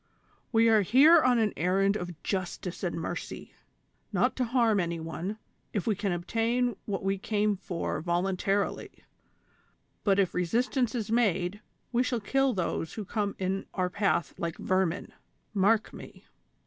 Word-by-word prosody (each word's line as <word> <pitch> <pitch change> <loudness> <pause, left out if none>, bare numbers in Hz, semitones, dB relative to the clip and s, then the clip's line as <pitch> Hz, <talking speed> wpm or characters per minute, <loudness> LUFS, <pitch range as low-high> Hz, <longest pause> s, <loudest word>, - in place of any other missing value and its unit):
We 230 -1 +4
are 220 -2 +5
here 280 - +7
on 250 -1 +4
an 220 -3 +1
errand 195 +3 +2
of 175 -5 -6
justice 185 -1 -3
and 175 -2 -2
mercy. 165 - -6 0.6
Not - - +1
to 255 - +1
harm 230 -3 +2
any 170 -2 -1
one, 165 +6 -5 0.4
if 205 - -1
we 220 - +2
can 200 0 -1
obtain 230 +7 0
what 200 -2 -3
we 195 0 0
came 210 0 +1
for 180 -2 -3
voluntarily; 190 +3 0 1.1
but 195 -2 +3
if 195 -3 +2
re 180 - 0
sistance 245 - 0
is 220 -2 -3
made, 205 -4 +1 0.3
we 240 0 +2
shall 250 -1 0
kill 270 +5 +1
those 170 -4 -2
who 215 - -5
come 205 0 -2
in 190 +1 -2
our 180 -1 0
path 195 -5 0
like 170 -1 -3
vermin; 185 -2 -1 0.4
mark 215 +2 +2
me - - -12
200 Hz, 155 wpm, -29 LUFS, 180-225 Hz, 1.1 s, here